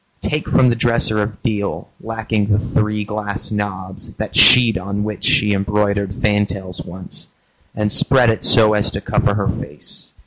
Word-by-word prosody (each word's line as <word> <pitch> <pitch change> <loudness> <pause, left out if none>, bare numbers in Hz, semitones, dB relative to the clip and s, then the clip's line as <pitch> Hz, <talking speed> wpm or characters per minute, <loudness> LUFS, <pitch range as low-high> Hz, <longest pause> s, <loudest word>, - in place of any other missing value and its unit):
Take 150 0 -3
from 130 -1 +3
the 120 - 0
dresser 115 -2 0
of 105 0 -6
deal, 105 -5 -3
Lacking 110 -2 -3
the 105 -1 +2
three 105 -1 -2
glass 105 0 -5
knobs, 95 -3 -6
that - - -7
sheet 120 -3 +7
On 100 +3 -4
which 105 0 -6
she 105 0 +2
embroidered 100 0 -1
fantails 100 -4 -1
once 90 +1 -9 0.5
And 105 0 -1
spread 125 -1 +5
it 110 - -5
so 110 -3 +5
as 105 -1 +1
to - - -4
cover 100 - 0
her 100 -2 -1
face. - - -6
105 Hz, 165 wpm, -17 LUFS, 100-110 Hz, 0.5 s, sheet